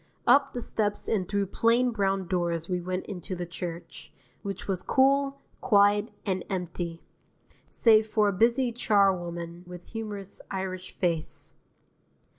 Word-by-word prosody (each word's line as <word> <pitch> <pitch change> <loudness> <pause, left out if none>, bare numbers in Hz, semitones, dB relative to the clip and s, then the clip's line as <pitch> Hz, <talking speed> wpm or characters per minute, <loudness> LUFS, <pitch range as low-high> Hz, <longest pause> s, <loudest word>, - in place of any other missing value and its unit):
Up 275 0 +5
the 245 - -3
steps 205 -2 -1
and 195 -5 0
through 200 -1 +1
plain 235 +5 +2
brown 195 -4 0
doors 170 -3 -1
we 180 -1 -1
went 185 +1 -3
into 185 -1 -5
the 175 0 -4
church, 175 0 -7 0.3
which 195 -1 -5
was 190 -2 -1
cool, 275 +3 +2 0.2
quiet, 205 -1 +4 0.2
and 190 -3 -1
empty, 175 -3 -4 0.7
save 220 -2 +4
for 215 -1 +2
a - - -1
busy 235 +5 +3
charwoman 175 -6 +1
with 180 0 -10
humorous 210 -3 -6
Irish 185 -1 -4
face. 170 -4 -2
195 Hz, 135 wpm, -28 LUFS, 180-220 Hz, 0.7 s, Up